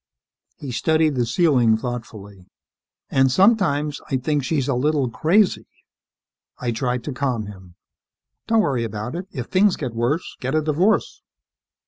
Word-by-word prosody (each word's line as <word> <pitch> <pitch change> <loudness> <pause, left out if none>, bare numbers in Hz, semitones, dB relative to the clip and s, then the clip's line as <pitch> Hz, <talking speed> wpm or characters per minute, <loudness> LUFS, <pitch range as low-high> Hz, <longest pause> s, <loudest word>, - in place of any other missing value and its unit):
He 140 - -7
studied 155 +4 +1
the 120 -3 0
ceiling 120 -5 +3
thoughtfully. 110 -6 -7 0.6
"And 135 -1 +3
sometimes 150 - +2
I 135 - +1
think 145 +2 -1
she's 140 -2 -1
a 140 - +1
little 140 0 0
crazy." 180 - +2 0.9
I 120 -1 -2
tried 125 +1 -2
to 145 - -5
calm 125 -5 -2
him, 95 -4 -12 0.7
"Don't 225 -1 +3
worry 130 - 0
about 110 +2 -5
it. 180 +3 -5
If 125 -7 -5
things 195 +5 +3
get 130 -6 -5
worse, 120 +9 -2
get 130 +3 -2
a 155 - +3
divorce." 165 +8 +1
135 Hz, 145 wpm, -22 LUFS, 120-155 Hz, 0.9 s, ceiling